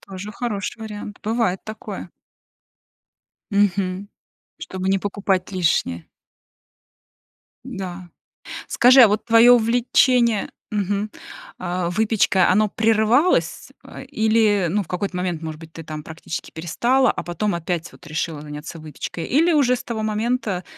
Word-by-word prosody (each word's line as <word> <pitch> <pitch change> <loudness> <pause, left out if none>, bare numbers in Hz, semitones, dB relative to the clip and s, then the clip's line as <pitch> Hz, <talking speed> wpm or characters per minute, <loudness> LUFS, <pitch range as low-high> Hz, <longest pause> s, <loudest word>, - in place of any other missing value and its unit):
тоже 195 +2 -8
хороший 225 -2 -4
вариант, 210 -1 -8
бывает 220 -4 0
такое. 215 0 -8 1.4
Мгм, 200 -1 0 0.5
чтобы 190 0 -4
не 195 0 +2
покупать 195 -2 -1
лишнее. 165 - 0 1.6
Да. 190 -7 -7 0.6
Скажи, 255 +2 +6
а 230 - +8
вот 210 +1 -1
твоё 235 +1 +7
увлечение 240 -1 +3 0.2
мгм, 205 0 -1 0.5
а, 180 -1 -2
выпечкой 205 -1 +2
оно 210 +4 +3
прерывалось, 225 - +2
э, - - -10
или, 220 -3 +2
ну, 205 +5 0
в 180 - -12
какой-то 180 +1 -3
момент, 180 -3 -2
может 160 -2 -6
быть, 165 0 -13
ты, 165 - -9
там, 155 -1 -7
практически 160 +1 -7
перестала, 240 +11 +1
а - - -3
потом 175 +3 -2
опять, 170 0 -3
вот, - - -17
решила 155 -1 -3
заняться 150 +2 -8
выпечкой? 155 +2 -6
Или 330 +7 +3
уже 255 -4 +3
с - - -7
того 225 -2 -4
момента, 215 -3 -1
200 Hz, 130 wpm, -22 LUFS, 175-225 Hz, 1.6 s, а